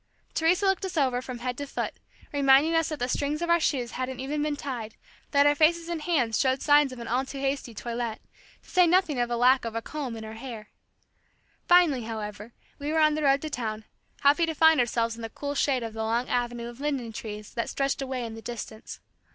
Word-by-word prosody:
Teresa 345 +5 +2
looked 385 0 +2
us 375 -3 -4
over 255 -4 +2
from 255 -1 -6
head 250 +1 -3
to 285 - -4
foot, - - -3 0.4
reminding 280 +3 +5
us 325 -1 +2
that 305 - -3
the 245 - -1
strings 285 +3 -1
of 340 - 0
our 340 - +5
shoes 255 -6 0
hadn't 255 0 -4
even 290 +3 -2
been 300 0 0
tied, 245 -7 -5 0.3
that 285 -1 +4
our 290 - +6
faces 330 +3 +2
and 335 -2 -3
hands 260 -10 +1
showed 260 0 +1
signs 290 -2 +5
of 255 - -8
an 235 - -7
all 250 +3 +1
too 275 +1 -8
hasty 270 -3 -2
toilet, 235 0 -4 0.4
to - - -23
say 360 -1 +5
nothing 335 -6 +2
of 240 0 0
a 240 - 0
lack 255 +2 +4
of 230 -1 -5
a 230 - -1
comb 275 -7 -5
in 220 - -7
our 220 - -7
hair. 225 -2 -8 1.0
Finally, 350 -8 +5
however, 215 0 -6 0.3
we 290 +1 -3
were 320 - 0
on 305 -1 +5
the 310 - -2
road 275 0 +3
to 310 - -3
town, 220 -5 -4 0.4
happy 295 +4 +4
to 320 - -2
find 320 -1 +6
ourselves 230 -1 +1
in 230 - -10
the 225 - -5
cool 285 +5 -5
shade 270 -3 +1
of 225 -1 -5
the 220 - -4
long 230 +3 0
avenue 240 -1 -2
of 240 +1 -10
linden 275 -6 -2
trees 210 -1 -7
that 235 - -2
stretched 275 0 -1
away 260 -2 -3
in 225 - -6
the 225 - -9
distance. 225 -2 -7
265 Hz, 235 wpm, -27 LUFS, 235-295 Hz, 1.0 s, our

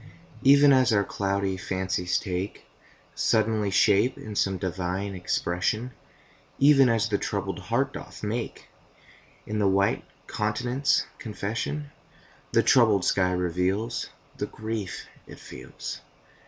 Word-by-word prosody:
Even 140 +1 +7
as 130 -2 +4
our 100 -2 +3
cloudy 100 -1 -1
fancies 95 -1 -1
take 95 +1 -4 0.5
Suddenly 110 -2 +1
shape 105 +5 +3
in 105 -1 -8
some 95 -1 +1
divine 95 +2 -3
expression, 90 +6 -1 0.7
Even 135 -2 +6
as 115 -1 +2
the 100 - 0
troubled 100 -1 -3
heart 120 +8 -1
doth - - -9
make 115 +3 -4 0.8
In 105 0 -3
the 100 - +3
white 100 +1 +2 0.2
countenance 120 +6 0
confession, 115 +7 -4 0.6
The - - +4
troubled 110 -7 +4
sky 90 -1 +2
reveals 90 +5 -1 0.3
The - - -2
grief 110 -3 -5 0.2
it - - -11
feels. - - -8
105 Hz, 115 wpm, -26 LUFS, 95-115 Hz, 0.8 s, Even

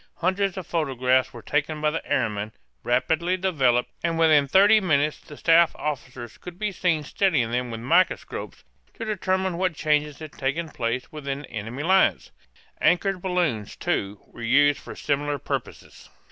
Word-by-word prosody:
Hundreds 190 +2 0
of 185 - -5
photographs 130 -6 +1
were 120 - -11
taken 150 +1 -1
by 150 0 +1
the 165 - -3
airmen, 110 -6 0 0.3
rapidly 160 +9 +1
developed, 135 -10 +1
and 165 -1 0
within 155 -3 +4
thirty 205 +8 +6
minutes 150 -4 +1
the 150 - -13
staff 165 0 +4
officers 125 -5 -6
could 180 -1 -10
be 210 +1 -2
seen 175 -5 0
studying 150 - +1
them 125 0 -1
with 115 -1 -6
microscopes 170 +9 0 0.3
to 225 - -6
determine 190 -3 -1
what 185 -3 0
changes 150 -1 0
had 155 -2 -9
taken 155 +5 -2
place 120 0 -3
within 140 -2 -5
the - - -14
enemy's 120 +6 -5
lines. 190 +2 +3 0.5
Anchored 185 +1 +2
balloons, 175 - -1
too, 100 0 -2
were - - -14
used 140 +5 +4
for - - -10
similar 145 0 -1
purposes. - - -6
150 Hz, 160 wpm, -24 LUFS, 130-180 Hz, 0.5 s, thirty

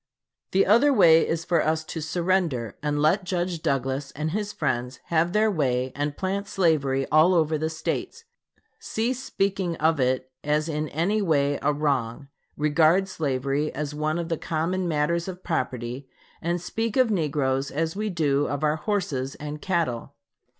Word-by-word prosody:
The 195 - +3
other 235 +8 +5
way 170 -9 +6
is 165 0 -2
for 170 -3 +2
us 160 0 0
to 160 +1 -6
surrender 165 - 0
and 150 0 -1
let 160 +7 +3
Judge 175 -2 -2
Douglas 135 0 -1
and 155 +2 -2
his 205 +2 -2
friends 125 +1 -2
have 170 +1 +2
their 215 +2 +3
way 130 -6 0
and 145 0 -2
plant 195 +1 -2
slavery 140 -8 +1
over 160 0 +4
all - - -2
the 160 +1 -1
States; 160 - -4 0.6
cease 245 +4 -2
speaking 195 -3 -1
of 160 -1 +1
it 130 0 0
as 150 +1 +1
in 155 -1 -2
any 190 +8 0
way 145 -6 +1
a 150 - +2
wrong; 140 -3 -1 0.3
regard 160 +5 +3
slavery 140 -2 -1
as 150 0 -3
one 155 +2 -1
of 170 -1 -3
the 165 - -1
common 175 +3 -1
matters 170 +2 0
of 185 -1 -7
property 125 -4 -3 0.3
and 170 +1 -1
speak 225 +7 -3
of 255 -3 +4
negroes 140 -6 0
as 160 +3 -2
we 215 +1 -2
do 145 -5 +1
of 145 +2 -3
our 150 +1 +2
horses 155 -9 -2
and 150 0 -7
cattle. 155 -9 -1
155 Hz, 165 wpm, -25 LUFS, 140-180 Hz, 0.6 s, way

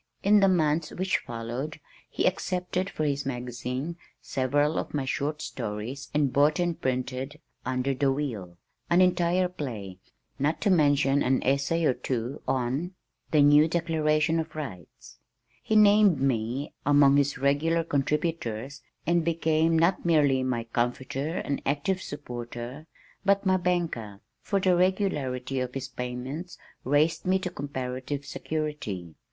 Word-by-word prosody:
In 205 +1 +6
the 195 - +5
months 160 -3 +2
which 185 +1 0
followed 120 +6 -5 0.3
he - - -1
accepted 180 +1 -1
for 155 - -3
his 140 -1 0
magazine 125 +4 -4 0.2
several 145 +4 0
of - - -5
my 140 -2 -1
short 150 +3 -2
stories 120 +4 -5
and 145 -3 +1
bought 145 +2 +4
and 175 -2 -1
printed 130 +3 -2 0.3
Under 130 +1 0
the 135 +1 +2
Wheel, 110 -12 -4 0.3
an 175 - +4
entire 180 0 +3
play, 110 - -6 0.4
not 150 +4 +1
to 205 - +3
mention 145 -4 +3
an 130 +1 +2
essay 140 +5 +1
or 130 - +4
two 125 +2 -3
on 135 +8 -1 0.3
The 150 -2 +5
New 145 +2 +6
Declaration 160 -1 +1
of 160 -1 -5
Rights. 105 - -8 0.4
He 220 - -1
named 205 -5 +6
me 130 +1 -1
among 145 -1 +5
his 145 0 +1
"regular 145 +5 +2
contributors," 145 -4 -2 0.2
and 170 0 +2
became 160 0 +2
not 170 +4 +2
merely 145 -6 +3
my 125 -3 -1
comforter 130 +6 -2
and 140 - -2
active 155 +7 0
supporter 125 0 -7 0.4
but 200 0 +2
my 185 0 +4
banker, 165 - -2 0.2
for 200 - 0
the 185 -1 +3
regularity 145 -9 0
of 125 0 -3
his 135 0 -4
payments 130 +7 -5 0.3
raised 145 +5 +2
me 190 +1 +4
to 185 -1 -4
comparative 135 0 -4
security. 150 - -4
145 Hz, 140 wpm, -27 LUFS, 130-165 Hz, 0.4 s, In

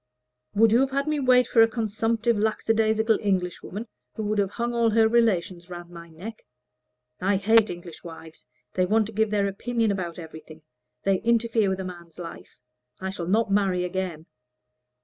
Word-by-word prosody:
"Would 220 +1 +5
you 230 - +5
have 270 0 +2
had 275 +2 -1
me 305 -1 0
wait 250 -2 +4
for 225 - +4
a 225 - +7
consumptive 225 +1 0
lackadaisical 220 +1 +1
Englishwoman, 195 +2 -2 0.3
who 220 - -4
would 210 0 0
have 200 -2 +1
hung 235 +3 -3
all 235 -1 +3
her 225 0 +4
relations 190 -6 +1
around 175 -1 -9
my 170 -1 -11
neck? 195 +8 -9 0.8
I 195 +2 +1
hate 220 +3 +4
English 175 -1 -9
wives; 165 -1 -12 0.3
they 185 -1 +1
want 220 +2 +3
to 220 - -8
give 220 +1 +1
their 205 -1 +1
opinion 225 +2 -1
about 175 -4 -4
everything. 160 -1 -11 0.4
They 195 -1 +2
interfere 230 -2 +2
with 190 0 -2
a - - -5
man's 175 -2 -10
life. 170 -2 -9 0.4
I 190 0 -3
shall 175 -3 -5
not 215 +2 +1
marry 195 -3 +2
again." 180 -3 -4
205 Hz, 175 wpm, -25 LUFS, 180-225 Hz, 0.8 s, a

